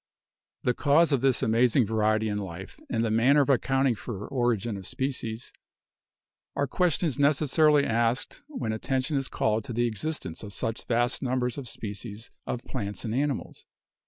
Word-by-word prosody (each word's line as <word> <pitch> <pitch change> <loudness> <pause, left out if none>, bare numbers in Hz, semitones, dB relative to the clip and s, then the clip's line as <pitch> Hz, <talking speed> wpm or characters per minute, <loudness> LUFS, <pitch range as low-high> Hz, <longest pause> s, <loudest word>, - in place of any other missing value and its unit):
The 125 - +2
cause 150 +6 +3
of 135 -4 +2
this 135 -3 +3
amazing 120 +2 +3
variety 110 0 +1
in 105 -1 -1
life, 95 -1 -8
and 115 -1 0
the 110 - 0
man 115 +6 +4
ner 150 - +6
of 140 - +2
accounting 135 0 +2
for 105 -2 -6
origin 120 -4 0
of 95 -2 -7
species 125 -4 -3 1.0
are 140 - +1
questions 165 -2 0
necessarily 150 +1 +4
asked 115 +2 0
when 260 - -3
attention 130 +6 -1
is 135 -1 0
called 110 0 0
to 125 - -5
the 120 +2 +1
existence 110 - -3
of 105 -2 -8
such 115 +2 -3
vast 120 +1 +1
numbers 125 -1 0
of 130 - -7
species 105 0 -7 0.2
of 125 - -3
plants 105 -7 -5
and 110 - -2
animals. 140 +1 -2
120 Hz, 165 wpm, -27 LUFS, 110-135 Hz, 1.0 s, ner